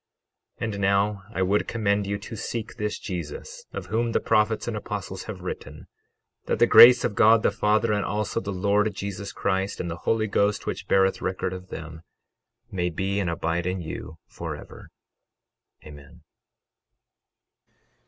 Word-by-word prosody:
12:41 - - -4
And 100 - -5
now, 100 +1 +1
I 95 -4 0
would 100 +3 +1
commend 100 -3 0
you 100 0 -1
to 105 +2 -8
seek 115 +1 -5
this 105 -2 -2
Jesus 85 -7 -6
of 100 - -6
whom 115 +4 -1
the - - +3
prophets 110 0 +1
and 120 - -2
apostles 100 -3 -5
have 100 -4 -7
written, 90 - -7 0.6
that - - 0
the - - +6
grace 120 0 +9
of 110 - 0
God 110 +1 +5
the - - +3
Father, 105 +1 +2
and 105 -1 0
also 105 -2 -1
the 100 - -5
Lord 100 +3 +1
Jesus 100 0 -5
Christ, 95 0 -1
and 85 - -3
the 80 - -5
Holy 110 -1 +2
Ghost, 100 0 +1
which - - -4
beareth 95 0 +3
record 95 0 -2
of 95 0 -8
them, 80 -2 -8 0.7
may 90 -2 -1
be 95 +4 -2
and 95 -4 0
abide 85 +1 -1
in 90 +1 -1
you 80 -1 -7
forever. - - -8 1.0
Amen. 70 -2 -13
100 Hz, 165 wpm, -25 LUFS, 95-105 Hz, 1.0 s, grace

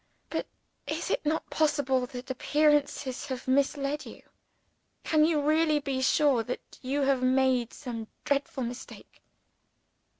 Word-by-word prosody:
But - - -2 0.4
is - - -3
it - - 0
not 315 +1 -1
possible 265 -5 +1
that 250 +1 -7
appearances 290 -1 +1
have 260 -1 -5
misled 280 +2 +1
you? - - -11 0.8
Can 310 -1 +4
you 315 -2 +2
really 305 +1 +3
be 275 -3 -2
sure 265 -1 +3
that 245 +2 -7
you 275 +3 -1
have 270 -2 +2
not 255 - +3
made 260 -3 +2
some 235 -5 -6 0.2
dreadful 280 -2 0
mistake?" 245 +2 -8
275 Hz, 135 wpm, -29 LUFS, 255-295 Hz, 0.8 s, Can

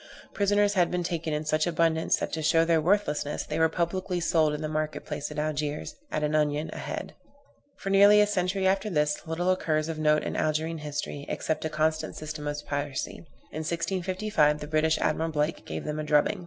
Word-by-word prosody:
Prisoners 205 0 +2
had 180 -3 +3
been 180 0 -1
taken 165 -2 -2
in 150 +1 -2
such 155 +2 +1
abundance, 165 -1 +2
that - - -4
to 160 - -2
show 165 +1 +4
their 165 -1 +3
worthlessness, 150 -5 0
they - - -3
were 160 0 +4
publicly 180 +2 -1
sold 160 -2 +2
in 150 +1 -4
the - - -1
market 155 0 -3
place 150 -1 -4
at - - -8
Algiers, 150 -1 -2 0.2
at 155 - -1
an 150 0 0
onion 150 0 +1
a - - -7
head. - - -5 0.6
For 195 - -4
nearly 200 +1 +7
a 210 - +6
century 190 -1 0
after 195 +2 +2
this, 150 -4 +1
little 175 +3 0
occurs 155 -4 0
of 160 -1 -4
note 150 0 +3
in - - -3
Algerine 155 +1 0
history 145 -1 -5
except 160 - -2
a - - 0
constant 155 +1 0
system 155 -1 -6
of 145 0 -4
piracy. 145 -1 -3 0.3
In 155 - -5
1655 170 -1 0
the 150 - -6
British 155 +1 +2
Admiral 165 +1 0
Blake 155 +1 -2
gave - - -4
them 150 0 -3
a - - -2
drubbing. 150 +7 +2
155 Hz, 205 wpm, -27 LUFS, 150-175 Hz, 0.6 s, nearly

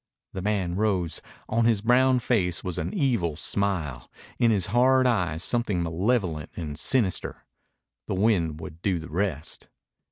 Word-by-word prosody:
The 95 - -4
man 95 -3 -1
rose. 95 -6 0 0.3
On 115 +1 +1
his 115 -3 +3
brown 130 +3 +4
face 95 -8 0
was 90 -3 -3
an - - -3
evil 120 - 0
smile, 85 -8 -2 0.3
in 120 - +4
his 100 -5 +2
hard 130 +1 +4
eyes 90 -9 +1
something 105 -8 +1
malevolent 85 - -1
and 75 -4 -5
sinister. 110 - 0 0.6
The - - -2
wind 90 -7 +1
would 80 0 -9
do 95 -2 0
the 80 -1 -8
rest. 85 -4 -3
95 Hz, 150 wpm, -26 LUFS, 85-115 Hz, 0.6 s, brown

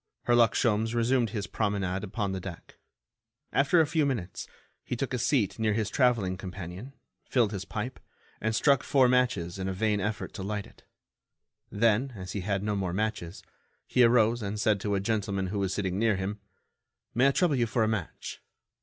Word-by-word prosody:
Herlock 120 -2 +4
Sholmes 115 -1 +1
resumed 120 0 +2
his 105 -1 -3
promenade 100 -3 -1
upon 105 0 -2
the 95 - -3
deck. 90 -2 -9 0.8
After 140 +5 +4
a 160 - +5
few 150 +1 +1
minutes, 115 -10 -3 0.4
he - - -3
took 130 +2 -3
a 125 - 0
seat 120 -5 +1
near 110 -1 +2
his 105 -1 -1
travelling 115 -8 +2
companion, 95 +6 -7 0.3
filled 120 -5 +1
his 95 -2 -4
pipe, 110 +6 -5 0.4
and 110 0 0
struck 140 +2 +4
four 135 -3 +4
matches 120 -9 +1
in 95 - -2
a 95 - -1
vain 105 +2 +1
effort 105 +2 -3
to 105 - -6
light 105 +1 -3
it. - - -19 0.9
Then, 115 +4 +2
as 95 -2 -7
he 100 - -3
had 100 +1 -1
no 105 0 0
more 95 -3 -2
matches, 100 -4 -3 0.4
he 125 - +2
arose 115 0 +4
and 105 +1 -3
said 105 -1 +2
to 105 -1 0
a - - +1
gentleman 100 -2 -1
who 100 +1 -2
was 95 -2 0
sitting 95 -1 -1
near 110 -2 +3
him: 95 +2 -3 0.7
"May 125 +3 +4
I - - +5
trouble 165 0 +2
you 120 -1 +2
for 115 0 +1
a - - +2
match?" 110 -6 -4
105 Hz, 190 wpm, -28 LUFS, 95-120 Hz, 0.9 s, a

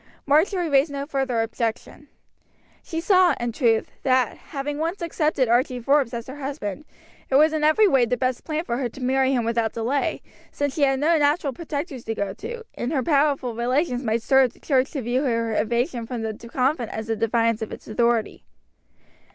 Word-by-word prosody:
Marjory 335 +5 +2
raised 280 0 +3
no 280 0 -4
further 270 -5 0
objection. 230 +5 -4 0.7
She 325 - -5
saw, 365 0 +4
in 240 -1 -2
truth, 225 -2 +1
that, 255 -3 +2
having 290 0 -5
once 335 +5 -2
accepted 310 -5 0
Archie 250 +2 +1
Forbes 275 0 +2
as 235 -1 -5
her 265 +2 -9
husband, 275 -3 -5 0.4
it 265 - +1
was 305 +3 +5
in 310 -1 -1
every 310 +8 +5
way 270 -9 +4
the 250 +2 -1
best 255 0 -1
plan 315 0 -2
for 235 -8 -2
her 250 -2 -2
to 250 - -13
marry 265 +1 +2
him 245 -4 +1
without 230 -1 0
delay, 245 +5 -1 0.3
since 285 -1 -2
she 305 - -4
had 270 -1 +3
no 320 +3 +3
natural 290 -1 +1
protectors 290 -3 -5
to 225 - -3
go 200 -2 -2
to, 460 - -7
and 245 - -3
her 270 -5 0
powerful 280 -5 +1
relations 250 +3 0
might 225 -2 -1
stir 265 +2 +5
up 245 - -5
the - - -22
church 265 -2 +1
to 275 -5 -3
view 245 +3 0
her 230 -5 0
evasion 235 +2 -1
from 240 -2 -4
the 220 -1 -2 0.2
convent 255 -2 0
as 220 0 -5
a 225 - 0
defiance 230 0 +1
of 220 - -4
its - - -9
authority. 235 0 0
265 Hz, 200 wpm, -23 LUFS, 235-295 Hz, 0.7 s, was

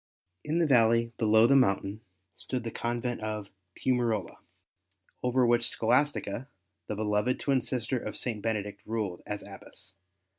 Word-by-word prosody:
In 155 +2 -1
the 170 - +3
valley 115 -3 +4
below 110 -1 +5
the 140 - +5
mountain 100 -4 +2 0.3
stood 125 -3 -4
the 115 - -4
convent 120 +1 -2
of 105 -2 -4 0.2
Piumarola, 115 -7 0 0.8
over 125 0 +3
which 120 0 +3
Scholastica, 125 -1 +1 0.4
the 105 - -3
beloved 105 +3 0
twin 135 -2 +2
sister 125 +1 -1
of 105 - -5
St. 115 -4 -3
Benedict, 105 -2 -2
ruled 105 -6 -2
as 105 0 -4
Abbess. - - -10
115 Hz, 140 wpm, -29 LUFS, 105-125 Hz, 0.8 s, below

